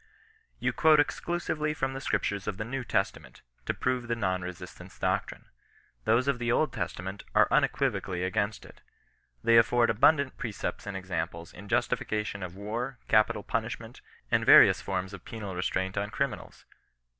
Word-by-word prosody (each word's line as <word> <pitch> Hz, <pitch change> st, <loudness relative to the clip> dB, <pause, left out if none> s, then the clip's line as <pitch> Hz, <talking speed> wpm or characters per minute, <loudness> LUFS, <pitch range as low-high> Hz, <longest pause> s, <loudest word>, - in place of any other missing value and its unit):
"You -, -, -1 dB
quote 155 Hz, -2 st, +5 dB
exclusively 150 Hz, -1 st, -1 dB
from 135 Hz, -2 st, -2 dB
the 135 Hz, -, -6 dB
scriptures 100 Hz, -7 st, -1 dB
of 105 Hz, -3 st, -2 dB
the 110 Hz, -, -4 dB
New 130 Hz, +3 st, -4 dB
Testament, 80 Hz, -, -2 dB, 0.2 s
to -, -, +1 dB
prove 125 Hz, -1 st, -1 dB
the 120 Hz, -, 0 dB
non 95 Hz, -5 st, -1 dB
resistance 90 Hz, 0 st, -9 dB
doctrine. -, -, -2 dB, 0.6 s
Those 120 Hz, +4 st, +3 dB
of 140 Hz, -3 st, +1 dB
the 120 Hz, -1 st, 0 dB
Old 150 Hz, +1 st, +1 dB
Testament 95 Hz, +3 st, -5 dB
are -, -, +6 dB
unequivocally 90 Hz, -1 st, +1 dB
against 100 Hz, +3 st, -1 dB
it. -, -, -16 dB, 0.6 s
They 115 Hz, -, +5 dB
afford 120 Hz, +1 st, +4 dB
abundant 140 Hz, +4 st, +3 dB
precepts 105 Hz, -5 st, -4 dB
and 100 Hz, -2 st, -3 dB
examples 85 Hz, -3 st, -4 dB
in 100 Hz, +3 st, -11 dB
justification 110 Hz, -3 st, -1 dB
of 90 Hz, -1 st, -6 dB
war, 115 Hz, +6 st, -4 dB
capital 110 Hz, -1 st, +3 dB
punishment, 115 Hz, +2 st, -4 dB, 0.3 s
and -, -, +3 dB
various -, -, +8 dB
forms 95 Hz, 0 st, -3 dB
of 95 Hz, -, -9 dB
penal 105 Hz, -4 st, -6 dB
re 90 Hz, -, -3 dB
straint 95 Hz, +1 st, -1 dB
on 105 Hz, -, -4 dB
criminals. 140 Hz, +4 st, -4 dB
110 Hz, 160 wpm, -29 LUFS, 95-125 Hz, 0.6 s, various